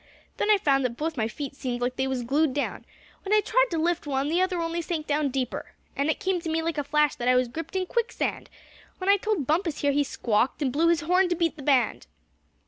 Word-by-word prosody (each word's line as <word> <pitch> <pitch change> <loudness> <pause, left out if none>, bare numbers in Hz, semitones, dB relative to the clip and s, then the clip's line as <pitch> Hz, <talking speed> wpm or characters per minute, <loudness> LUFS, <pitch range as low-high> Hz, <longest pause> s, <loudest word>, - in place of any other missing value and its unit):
Then - - 0
I 420 - +6
found 275 -7 +2
that 235 -2 -2
both 320 +1 -2
my 220 -4 0
feet 275 +5 -6
seemed 250 -3 -3
like 245 +1 -1
they 265 +1 0
was 260 -2 -2
glued 280 +3 +1
down. 285 - -3 0.4
When 405 - -2
I - - +6
tried - - +2
to 330 - -2
lift 340 0 0
one, 275 0 0
the 345 +3 +2
other 370 -1 0
only 335 +1 -2
sank 320 -2 -3
down 295 -1 0
deeper. 260 -2 -4 0.2
And 280 +2 0
it 315 - 0
came 375 -2 0
to 330 - -4
me 325 0 0
like 325 -2 -1
a - - -1
flash 300 0 +2
that 240 - -3
I 250 - +5
was 250 0 +3
gripped 325 +8 -7
in 375 -1 0
quicksand. 470 +5 -2 0.5
When 380 +1 +2
I 405 - +5
told 405 -7 -1
Bumpus 320 +2 0
here 285 - +3
he 290 +1 +2
squawked, 245 +2 0
and 260 -3 0
blew 325 +4 +3
his 335 -1 +3
horn 360 +3 +3
to 350 - +1
beat 330 -1 0
the 300 - -10
band." 270 -2 +1
305 Hz, 255 wpm, -26 LUFS, 270-345 Hz, 0.5 s, I